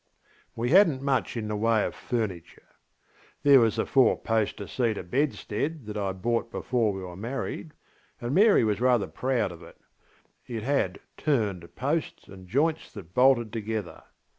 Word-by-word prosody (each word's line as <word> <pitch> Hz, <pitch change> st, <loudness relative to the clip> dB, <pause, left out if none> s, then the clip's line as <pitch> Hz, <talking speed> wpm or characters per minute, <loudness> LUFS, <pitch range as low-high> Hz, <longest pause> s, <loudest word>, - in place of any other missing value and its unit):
We 120 Hz, +3 st, -1 dB
hadnŌĆÖt 170 Hz, -7 st, +5 dB
much 135 Hz, -3 st, 0 dB
in 110 Hz, -2 st, -3 dB
the 105 Hz, -, -2 dB
way 110 Hz, 0 st, +2 dB
of -, -, -4 dB
furniture. 100 Hz, -9 st, -5 dB, 0.7 s
There 140 Hz, -2 st, +8 dB
was 115 Hz, -2 st, +2 dB
the -, -, 0 dB
four 130 Hz, -2 st, +4 dB
poster 110 Hz, -2 st, -1 dB
cedar 115 Hz, -3 st, -1 dB
bedstead 140 Hz, -, -2 dB
that 105 Hz, 0 st, -6 dB
I 100 Hz, -2 st, -1 dB
bought 115 Hz, +5 st, -1 dB
before 115 Hz, -2 st, 0 dB
we 95 Hz, -1 st, -6 dB
were 90 Hz, -1 st, -8 dB
married, 130 Hz, -, -5 dB, 0.5 s
and 120 Hz, +2 st, -3 dB
Mary 205 Hz, -, +5 dB
was 110 Hz, 0 st, 0 dB
rather 125 Hz, -4 st, +3 dB
proud 115 Hz, +5 st, -1 dB
of 85 Hz, -, -11 dB
it: -, -, -14 dB, 0.7 s
it 115 Hz, -3 st, -5 dB
had 140 Hz, +3 st, 0 dB, 0.2 s
ŌĆśturnedŌĆÖ 100 Hz, -, -1 dB
posts 150 Hz, +5 st, -2 dB
and 95 Hz, -1 st, -13 dB
joints 150 Hz, -, 0 dB
that 90 Hz, -5 st, -11 dB
bolted 125 Hz, -3 st, +4 dB
together. 110 Hz, -6 st, -4 dB
115 Hz, 160 wpm, -27 LUFS, 105-135 Hz, 0.7 s, There